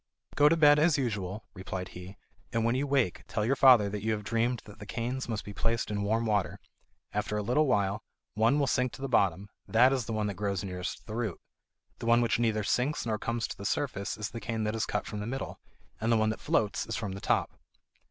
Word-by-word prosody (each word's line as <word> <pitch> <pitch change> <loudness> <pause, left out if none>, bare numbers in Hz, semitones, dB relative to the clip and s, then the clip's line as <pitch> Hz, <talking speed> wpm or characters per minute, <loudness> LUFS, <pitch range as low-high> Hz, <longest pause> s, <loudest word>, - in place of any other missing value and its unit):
"Go 145 +1 +5
to 165 - +3
bed 150 -2 +6
as 155 0 +4
usual," 105 -6 -3
replied 95 -1 -5
he, 90 +2 -10 0.3
"and 115 -1 0
when 115 - +2
you 135 +3 0
wake, 135 -10 +1
tell 105 - -1
your 135 +4 +2
father 125 -6 +7
that 100 0 -4
you 110 +1 0
have 105 -1 -4
dreamed 115 +3 0
that 105 - -13
the 105 - -9
canes 120 +2 -3
must 110 -3 -3
be 105 - -7
placed 115 +1 -1
in 100 -1 -1
warm 110 +3 +1
water. 105 -3 0 0.5
After 105 - -1
a 105 - -1
little 125 +8 +2
while 100 -4 +1 0.3
one 115 +6 +3
will 145 - +2
sink 125 -1 0
to - - -10
the - - -1
bottom; 100 -5 +2 0.2
that 125 +4 +5
is 130 -4 -1
the 115 - -4
one 110 -1 0
that 100 - -1
grows 100 -1 -2
nearest 90 -1 -5
the 110 - -7
root. 115 -6 -2 0.6
The - - -5
one 120 0 +6
which 115 -1 +1
neither 110 -2 +1
sinks 125 +9 0
nor 110 -2 -1
comes 115 +1 -2
to - - -5
the 100 - -10
surface 100 -3 -2
is 105 -1 -4
the 115 - -6
cane 110 +1 -2
that 105 +1 -1
is 110 - -1
cut - - -2
from 105 - -5
the 105 - -4
middle; 135 +3 -5 0.4
and 115 +2 0
the 115 - +5
one 110 0 +2
that - - -6
floats 105 0 0
is 115 - -3
from 105 -3 -3
the 100 +1 -7
top." - - +1
110 Hz, 245 wpm, -30 LUFS, 105-125 Hz, 0.6 s, father